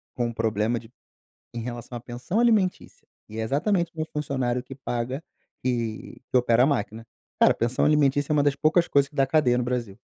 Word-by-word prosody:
com 120 -1 0
um 115 - -5
problema 110 +1 0
de 115 +1 -16 0.6
em 120 - -5
relação 120 +1 -6
à - - -5
pensão 125 - -3
alimentícia 215 -6 +1 0.2
e 110 +1 -8
é - - -1
exatamente 170 - 0
meu 155 - -1
funcionário 130 -4 -1
que 135 +1 -10
paga 125 +2 -4 0.4
que 120 -3 -3
que - - +2
opera 120 -1 +4
a - - +3
máquina. 115 -5 -2 0.3
Cara, - - +6
pensão 120 +2 0
alimentícia 145 -1 +2
é - - +3
uma 145 - +3
das 145 -1 +2
poucas 170 +2 +3
coisas 140 0 +3
que 150 - -24
dá 135 -1 +3
cadeia 135 -5 +3
no 125 - 0
Brasil. 120 -5 -3
125 Hz, 200 wpm, -25 LUFS, 120-145 Hz, 0.6 s, Cara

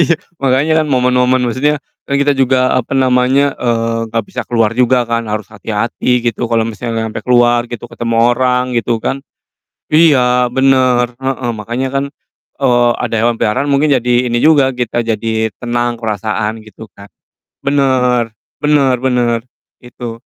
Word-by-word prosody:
iya, 170 0 +3 0.2
makanya 135 +3 +1
kan 155 - -1
momen-momen 125 -1 +2
maksudnya 130 +5 0 0.3
kan 140 - +1
kita 140 +1 +2
juga, 130 -1 +2
apa 130 -2 -1
namanya, 130 +2 +2
eee, 115 -1 -1
nggak 115 0 -2
bisa - - -5
keluar 115 -2 +1
juga 125 +1 +2
kan 115 -1 -2
harus 105 0 -3
hati-hati 115 +3 -1
gitu, 115 -3 -2
kalo 115 -1 +1
misalnya 115 0 -4
sampe 110 - -5
keluar 120 -1 +2
gitu, 120 -1 -7
ketemu 115 -1 -3 0.2
orang, 125 0 +1
gitu 120 0 0
kan, 135 +4 -3 0.7
iya, 130 -6 +4
bener, 130 -2 +2
heeh, 130 -1 -3
makanya 120 +5 -3
kan, 135 - 0 0.6
eee, 120 -2 +3
ada - - -3
yang - - 0
hewan 120 -1 +1
peliharaan 115 +6 0
mungkin 145 +2 +2
jadi 125 0 -1 0.2
ini 120 - 0
juga 145 0 +4
kita 125 -2 -2
jadi 110 0 -1
tenang, 120 0 -1
perasaan, 110 0 -3
gitu, 110 +1 -13
Kak. 100 0 -14 0.5
Bener 125 -5 +1 0.2
bener 145 -3 +2
bener, 120 -2 +1 0.4
itu. 120 -1 -8
125 Hz, 155 wpm, -14 LUFS, 115-130 Hz, 0.7 s, iya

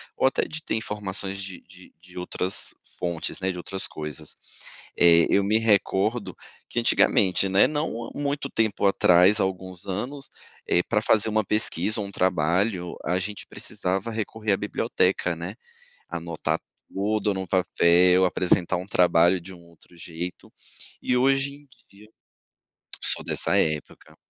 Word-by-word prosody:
ou - - +1
até 130 - +2
de 160 0 -7
ter - - -2
informações 100 -2 -3
de 95 -3 -8
de - - -17
de 90 +1 -16
outras 90 +1 -1 0.2
fontes, 85 -2 -3
né, 95 +1 0
de 90 - -7
outras 95 +2 -4
coisas. 75 -2 -6 0.6
Eh, 85 -1 +6
eu 100 - +3
me 105 +3 +2
recordo 105 -1 +1 0.3
que - - -2
antigamente, 95 0 +3
né, 95 +1 +5
não 145 -6 -3
há - - -11
muito 140 -1 -2
tempo 110 -4 0
atrás, 90 +1 +5
há - - +3
alguns 95 -2 -4
anos, 125 +9 -5 0.3
eh 90 - +3
pra 105 -2 0
fazer 110 0 +3
uma 110 0 +1
pesquisa 105 +1 0
ou 100 - -4
um - - -10
trabalho, 90 +1 0
a 90 +1 +1
gente 105 +2 -5
precisava 95 +4 -3
recorrer 110 -1 -2
à - - +1
biblioteca, 105 - 0
né, - - -6 0.5
anotar 85 0 -3 0.3
tudo 105 +1 0
no 95 0 -4
papel, 90 0 +4
apresentar 90 0 +1
um 90 +1 -5
trabalho 90 -1 +3
de 95 +2 -11
um 85 - -15
outro 85 +1 -20
jeito. 85 +1 -7 0.5
E 125 - 0
hoje 135 +2 +2
em 145 0 -18 0.2
dia 105 +2 -18 0.9
sou - - +4
dessa - - 0
época. 75 -2 -3
95 Hz, 155 wpm, -25 LUFS, 90-110 Hz, 0.9 s, Eh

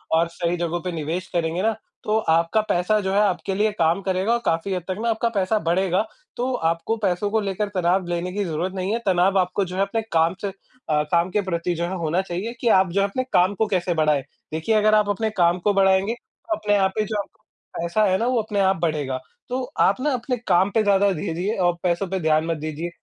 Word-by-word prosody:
और 165 +1 +3
सही 170 0 -1
जगहों 175 0 -2
पे 180 - -3
निवेश 165 +3 -3
करेंगे 170 +1 0
ना, 220 0 +2 0.3
तो 215 +1 +1
आपका 165 +6 +3
पैसा 180 +5 +2
जो 190 -1 -2
है 200 - +3
आपके 195 -1 0
लिए 210 +2 +2
काम 165 +3 +2
करेगा 190 +3 0
और 235 - +1
काफ़ी 165 +4 0
हद 180 -2 -3
तक 185 - -2
ना 235 - 0
आपका 225 +1 +1
पैसा 205 -1 0
बढ़ेगा। 185 +3 +1 0.3
तो 255 +2 -1
आपको 165 +2 0
पैसों 190 +1 +1
को 220 - +2
लेकर 200 +1 -2
तनाव 180 +1 +2
लेने 175 +1 -2
की 205 +1 -1
ज़रूरत 170 +3 -2
नहीं 190 +1 -2
है। 230 - 0
तनाव 190 +1 +3
आपको 185 +2 0
जो 180 0 -7
है - - +1
अपने 225 +3 -1
काम 165 +2 +3
से 205 - -2 0.4
अ, 150 -1 +2
काम 170 +1 +3
के 210 - +1
प्रति 175 -2 -2
जो 170 - -2
है 185 +2 -3
होना 170 +2 0
चाहिए 190 +5 -4
कि 240 - 0
आप 190 -3 +4
जो 195 +3 +1
है, 200 - +2
अपने 255 +6 -2
काम 180 +3 +4
को 220 +2 +1
कैसे 180 -3 0
बढ़ाएँ। 155 -3 +2 0.3
देखिए, 160 +8 0
अगर 215 0 +4
आप 210 -1 +3
अपने 220 +2 0
काम 170 +1 +3
को 205 +3 +1
बढ़ाएँगे, 195 +2 +3
तो 330 +7 -6
अपने 210 -1 +1
आप 190 -1 +2
ही 215 - +2
जो 210 0 -1 0.6
पैसा 170 +6 +1
है 190 -2 +2
ना, 230 - -1
वो 250 -2 +2
अपने 210 -1 -3
आप 190 0 +3
बढ़ेगा। 150 -6 -1 0.3
तो 255 +1 -2 0.2
आप - - +3
ना 295 +2 +1
अपने 250 0 -2
काम 185 +3 +4
पे 220 - +4
ज़्यादा 200 -1 +3
दीजिए 175 +6 -2
और 175 - +3
पैसों 180 +2 0
पे 190 +1 -1
ध्यान 155 -1 +2
मत 165 -1 -1
दीजिए 155 +2 -4
185 Hz, 240 wpm, -23 LUFS, 170-210 Hz, 0.6 s, आप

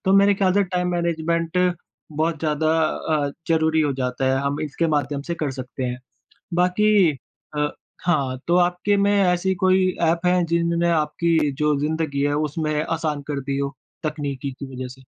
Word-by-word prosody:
तो 190 - +3
मेरे 200 0 +5
ख़्याल 190 -1 +2
से 200 +1 +3
टाइम 180 -1 -1
मैनेजमेंट 170 0 0 0.5
बहुत 160 +1 0
ज़्यादा 155 0 0 0.2
अ, 150 -2 -1 0.2
ज़रूरी 160 -1 +3
हो 145 -2 +1
जाता 125 +1 -1
है। 135 - +1
हम 140 +1 -1
इसके 155 +2 -1
माध्यम 145 -1 -2
से 170 +2 -3
कर 150 -4 -2
सकते 130 0 -6
हैं। 125 0 -3 0.6
बाकी 180 0 +4 0.5
अ, 150 0 +1 0.4
हाँ 140 -7 +1
तो 175 +1 +3
आपके 180 +3 +2
में 200 +1 +3
ऐसी 180 +1 +2
कोई 185 0 +4
एप 170 +1 +2
है, 180 0 +3
जिनने 170 0 +1
आपकी 160 -1 +1
जो 150 -1 +3
ज़िंदगी 150 -2 -1
है 145 0 +1
उसमें 155 +1 -2
आसान 155 -3 -2
कर 140 - -2
दी 135 +1 -3
हो? 140 0 -2 0.3
तकनीकी 140 -3 -3
की 135 +1 -8
वजह 130 0 -5
से। 130 +1 -13
160 Hz, 175 wpm, -22 LUFS, 145-175 Hz, 0.6 s, मेरे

